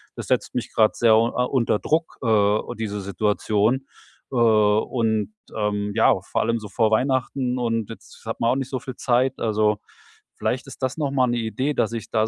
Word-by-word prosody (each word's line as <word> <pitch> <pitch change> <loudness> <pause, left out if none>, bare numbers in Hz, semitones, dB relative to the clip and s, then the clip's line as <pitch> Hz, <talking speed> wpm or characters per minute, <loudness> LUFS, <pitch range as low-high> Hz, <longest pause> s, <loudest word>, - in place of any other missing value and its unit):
das - - -7
setzt - - 0
mich - - -3
grad 110 -1 +3
sehr 115 -1 +4
a 115 +3 +2
unter 120 -5 +1
Druck, 160 +2 -1
äh, 105 -2 +3 0.2
diese 105 -2 -3
Situation. 105 +5 0 0.4
Äh, - - -5
und, 110 - +2 0.2
ähm, 105 -1 -1
ja, 110 - +5
vor - - -2
allem 115 0 0
so 105 -1 -9
vor 110 0 +1
Weihnachten 130 +1 0
und 115 -3 -1
jetzt 115 - -12
hat 115 - -4
man 115 - +2
auch - - +1
nicht 135 -1 -3
so 135 - -2
viel 130 -1 -8
Zeit.“ 130 +2 +1
Also, 105 -1 +1 0.6
vielleicht - - -2
ist - - -10
das 130 +2 -1
noch 150 -3 0
mal 130 -2 +3
'ne 120 0 0
Idee, 125 +5 -1
dass 115 -4 0
ich 115 -2 -6
da 110 0 +2
115 Hz, 195 wpm, -23 LUFS, 110-125 Hz, 0.6 s, ja